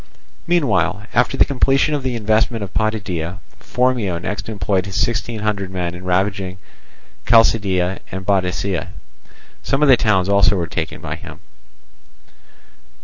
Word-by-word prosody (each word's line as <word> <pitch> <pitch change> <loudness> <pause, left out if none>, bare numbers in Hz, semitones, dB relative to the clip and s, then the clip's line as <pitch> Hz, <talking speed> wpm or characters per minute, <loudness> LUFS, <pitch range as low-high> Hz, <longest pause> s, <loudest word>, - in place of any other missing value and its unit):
Meanwhile, 105 - +1
after 135 - +2
the - - +5
completion 135 +2 +2
of 145 - 0
the 130 -2 -2
investment 110 0 +1
of 100 - -8
Potidæa, 95 -6 -2 0.2
Phormio 125 -8 0
next 105 +5 -5
employed 100 -2 -1
his 95 - -3
sixteen 115 -1 -1
hundred 100 -3 -2
men 90 -2 -3
in 90 +1 -9
ravaging 95 +1 -1 0.7
Chalcidice 95 -5 +3
and 95 0 -6
Bottica: 95 -1 0 0.7
some 135 - 0
of 150 - +4
the 130 - +9
towns 95 -5 +2
also 100 0 +4
were 90 -3 -1
taken 80 -1 -4
by - - -5
him. - - -11
100 Hz, 140 wpm, -19 LUFS, 90-115 Hz, 0.7 s, the